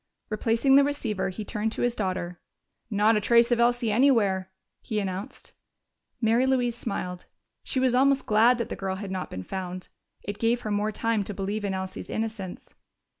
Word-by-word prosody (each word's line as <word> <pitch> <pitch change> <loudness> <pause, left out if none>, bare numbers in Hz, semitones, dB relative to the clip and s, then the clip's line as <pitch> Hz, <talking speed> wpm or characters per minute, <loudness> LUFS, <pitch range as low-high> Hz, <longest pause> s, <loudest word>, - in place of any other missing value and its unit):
Replacing 230 +5 +3
the 280 - +7
receiver, 250 -10 -1
he 210 +3 -6
turned 215 +1 -2
to - - -2
his 245 -1 +1
daughter. 185 -4 -3 0.5
"Not 215 +1 +3
a 210 - +1
trace 235 +3 +4
of 240 - +3
Elsie 240 -1 +2
anywhere," 210 -6 +3 0.3
he 215 - -2
announced. 190 0 -5 0.7
Mary 235 +3 +3
Louise 245 -3 +1
smiled: 180 -6 -5 0.3
she 260 - -2
was 255 -1 +2
almost 270 +1 +3
glad 225 +4 +5
that 235 - -3
the - - -4
girl 190 -1 -3
had 195 0 -6
not 185 -1 -4
been 95 - -6
found. 185 - -6 0.3
It 205 0 -5
gave 235 +1 +2
her 215 - -4
more 205 +1 0
time 225 -1 0
to 205 - -5
believe 205 +2 -3
in 195 -1 -1
Elsie's 190 0 -5
innocence. 220 -4 -5
215 Hz, 180 wpm, -26 LUFS, 190-240 Hz, 0.7 s, the